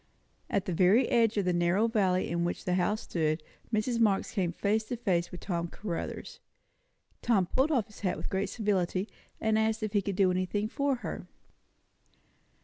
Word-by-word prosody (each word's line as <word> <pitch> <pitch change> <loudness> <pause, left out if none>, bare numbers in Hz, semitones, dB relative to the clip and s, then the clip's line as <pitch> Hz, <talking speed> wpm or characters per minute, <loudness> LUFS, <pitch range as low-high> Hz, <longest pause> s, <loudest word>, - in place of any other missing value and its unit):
At 195 - 0
the 185 - -2
very 190 +9 +4
edge 225 -2 +3
of 200 - +1
the 180 - +2
narrow 175 +6 +2
valley 190 -5 +1
in 170 0 -1
which 175 - -3
the 180 - +1
house 190 +4 +1
stood, 155 -2 -1 0.3
Mrs. 230 +2 0
Marx 205 -4 +2
came 185 -5 0
face 210 +5 0
to 245 - -4
face 180 -7 0
with 180 - -9
Tom 170 -3 -2
Caruthers. 170 -1 -5 0.8
Tom 205 -6 +3
pulled 265 - +1
off 255 -9 +2
his 210 - -15
hat 190 -3 -1
with - - -4
great 190 +1 0
civility, 195 -3 0 0.3
and 220 0 +2
asked 220 0 0
if 215 -1 -2
he 205 - +3
could 195 0 -3
do 190 -1 +4
anything 185 +3 -1
for 280 +3 0
her. - - -5
200 Hz, 185 wpm, -30 LUFS, 180-220 Hz, 0.8 s, very